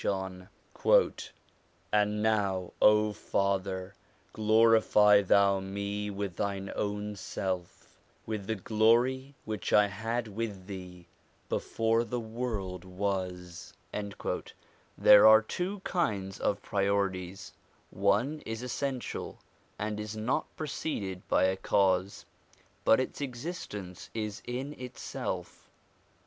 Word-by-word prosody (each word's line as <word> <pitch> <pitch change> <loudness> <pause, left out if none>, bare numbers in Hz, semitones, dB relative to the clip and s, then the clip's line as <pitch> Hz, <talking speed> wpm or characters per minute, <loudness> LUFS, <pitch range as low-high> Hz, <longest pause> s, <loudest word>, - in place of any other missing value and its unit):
JOHN 95 -1 -3 1.4
now, 105 -3 +1
O 105 0 +5
Father, 95 -2 -1 0.4
glorify 110 -1 +5
Thou 100 0 +4
me 100 +2 -3
with 100 -3 -4
Thine 100 -1 -2
own 105 0 -2
self, 95 -2 -5 0.3
with 105 -3 -4
the 110 - 0
glory 120 +7 +2
which 110 -2 -3
I 105 - +6
had 115 +4 -2
with 105 -3 -5
Thee 90 -3 -9 0.4
before 115 +1 +1
the 120 +1 -3
world 110 -6 -4
was.' 90 -2 -4 1.2
There 105 0 +8
are 110 0 +9
two 185 - -3
kinds 100 - -1
of 100 0 -1
priorities: 100 -1 -1 0.4
one 105 +11 +1
is 115 +1 -5
essential, 130 0 -3 0.4
and 105 0 -3
is 105 +1 -5
not 125 +8 0
preceded 105 - -4
by - - +3
a 95 0 +3
cause, 95 0 +1 0.6
but 110 - +5
its 130 - -3
existence 120 - -6
is 105 -2 -3
in 130 +4 -4
itself. 125 -1 -6
105 Hz, 105 wpm, -30 LUFS, 95-115 Hz, 1.4 s, are